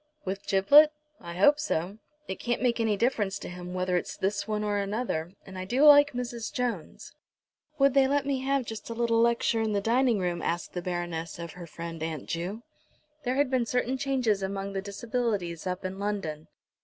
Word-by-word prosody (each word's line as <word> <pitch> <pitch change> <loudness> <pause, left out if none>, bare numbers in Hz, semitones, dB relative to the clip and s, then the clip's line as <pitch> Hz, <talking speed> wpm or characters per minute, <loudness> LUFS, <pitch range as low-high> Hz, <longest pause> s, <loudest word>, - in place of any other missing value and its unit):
"With 195 +1 -4
Giblet? 285 +11 +7 0.3
I 170 -1 -8
hope 285 +11 +5
so. 200 - -2 0.3
It 190 - -5
can't 240 +1 -1
make 240 -1 +2
any 220 -3 +1
difference 215 -4 0
to - - -8
him 180 0 -7
whether 185 0 0
it's - - -4
this 200 +1 -1
one 210 -1 -1
or 205 -1 0
another, 200 -5 -2
and 190 -1 -8
I 185 - -4
do 250 +9 +1
like 290 0 +8
Mrs. 240 -2 -4
Jones." 235 -10 -4 0.6
"Would 275 -2 +4
they 270 -1 +5
let 280 0 +1
me 275 -2 0
have 270 0 0
just 225 0 -7
a 230 - -4
little 230 -1 +2
lecture 235 -1 +2
in 220 -1 0
the 200 - +2
dining 235 +2 +2
room?" 175 -2 -1
asked 170 +1 -2
the 180 - -3
Baroness 175 -2 -4
of 170 -1 -6
her 175 -1 -10
friend, 165 0 -7
Aunt 160 -3 -4
Ju. 185 +7 -4 0.6
There 250 +1 0
had 280 -1 +2
been 250 -3 +1
certain 250 +2 0
changes 255 -7 0
among 195 +1 -3
the 195 - -2
Disabilities 200 -4 -2
up 180 +1 -3
in 190 +1 -4
London. 195 -7 -3
205 Hz, 200 wpm, -28 LUFS, 180-245 Hz, 0.6 s, like